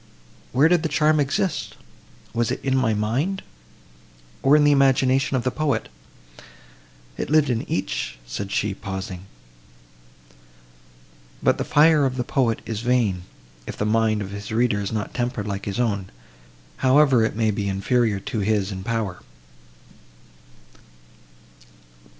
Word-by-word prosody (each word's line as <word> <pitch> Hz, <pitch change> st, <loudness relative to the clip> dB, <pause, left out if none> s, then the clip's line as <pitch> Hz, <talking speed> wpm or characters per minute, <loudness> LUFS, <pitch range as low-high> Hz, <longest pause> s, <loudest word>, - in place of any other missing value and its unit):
Where 135 Hz, +5 st, +4 dB
did 175 Hz, 0 st, +3 dB
the 160 Hz, -, -2 dB
charm 155 Hz, +1 st, +3 dB
exist?—Was 140 Hz, -, -3 dB
it 130 Hz, -, -2 dB
in 135 Hz, -1 st, +1 dB
my 120 Hz, -5 st, +2 dB
mind, 130 Hz, -, -1 dB, 1.0 s
or 140 Hz, +2 st, +5 dB
in 150 Hz, -, +5 dB
the 145 Hz, -, +5 dB
imagination 135 Hz, -1 st, +3 dB
of 120 Hz, -, -2 dB
the 130 Hz, -, 0 dB
poet? 155 Hz, 0 st, -1 dB, 1.3 s
It -, -, -4 dB
lived 150 Hz, -3 st, +3 dB
in 115 Hz, -, -3 dB
each," -, -, -2 dB
said 95 Hz, +12 st, -5 dB
she, 105 Hz, -1 st, 0 dB
pausing. 95 Hz, -2 st, -6 dB, 2.2 s
"But -, -, +3 dB
the -, -, 0 dB
fire 150 Hz, -1 st, +4 dB
of 130 Hz, 0 st, -5 dB
the 125 Hz, -, 0 dB
poet 120 Hz, -3 st, 0 dB
is 110 Hz, -2 st, -4 dB
vain, 115 Hz, -7 st, +1 dB, 0.4 s
if -, -, -6 dB
the 105 Hz, -, -1 dB
mind 110 Hz, -1 st, +1 dB
of 100 Hz, -, -8 dB
his 100 Hz, +1 st, -7 dB
reader 110 Hz, -2 st, +1 dB
is 100 Hz, -, -4 dB
not 110 Hz, -2 st, -3 dB
tempered 120 Hz, -4 st, -2 dB
like 100 Hz, -1 st, -4 dB
his 100 Hz, +2 st, -3 dB
own, 100 Hz, -6 st, -1 dB, 0.7 s
however 135 Hz, -2 st, +4 dB
it 110 Hz, -, -1 dB
may 110 Hz, -1 st, +1 dB
be 100 Hz, -1 st, -2 dB
inferior 105 Hz, +2 st, +1 dB
to 110 Hz, -, -4 dB
his 105 Hz, -1 st, 0 dB
in 95 Hz, -1 st, -6 dB
power." 110 Hz, -5 st, -3 dB
115 Hz, 140 wpm, -23 LUFS, 100-135 Hz, 2.2 s, or